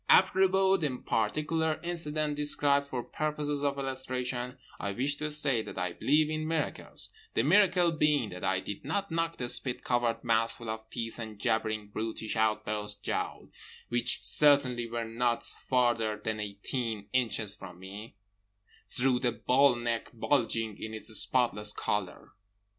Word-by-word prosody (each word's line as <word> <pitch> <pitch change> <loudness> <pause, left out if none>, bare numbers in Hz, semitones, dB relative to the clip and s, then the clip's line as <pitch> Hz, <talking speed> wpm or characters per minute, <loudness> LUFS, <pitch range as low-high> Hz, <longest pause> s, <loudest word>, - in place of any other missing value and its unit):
Apropos 190 0 +5
the 145 -7 -1
particular 155 +8 0
incident 155 -3 -1
described 145 -1 +2
for 125 -3 -3
purposes 150 -1 -1
of 140 -1 +1
illustration, 130 -1 -3 0.2
I 100 -1 -2
wish 140 +6 -1
to 150 0 -2
state 140 -6 +1
that - - -8
I 90 -1 -1
believe 150 - +3
in 155 0 -2
miracles: 160 -2 -1 0.2
the 115 - +3
miracle 180 +1 +5
being 150 -7 +2
that 90 -1 -8
I 95 0 +1
did 100 - -6
not 200 -3 -2
knock 165 0 -1
the 125 - -3
spit 125 +1 0
covered 120 -2 0
mouthful 115 0 0
of 110 0 -7
teeth 115 -1 -5
and 110 -2 -6
jabbering 110 -1 -1
brutish 110 +1 -4
outthrust 105 -1 0
jowl - - -3 0.4
(which 120 0 0
certainly 130 -5 +4
were 115 0 -2
not 120 +1 0
farther 120 -4 0
than 110 -1 -1
eighteen 105 +1 -3
inches 115 -5 +1
from 90 -3 -10
me) 100 +4 -9 0.7
through 125 0 +2
the 125 -2 +1
bullneck 120 -2 +2
bulging 115 -3 0
in 110 0 -5
its 110 0 -6
spotless 105 -4 +2
collar. 100 -4 -3
120 Hz, 145 wpm, -30 LUFS, 110-145 Hz, 0.7 s, Apropos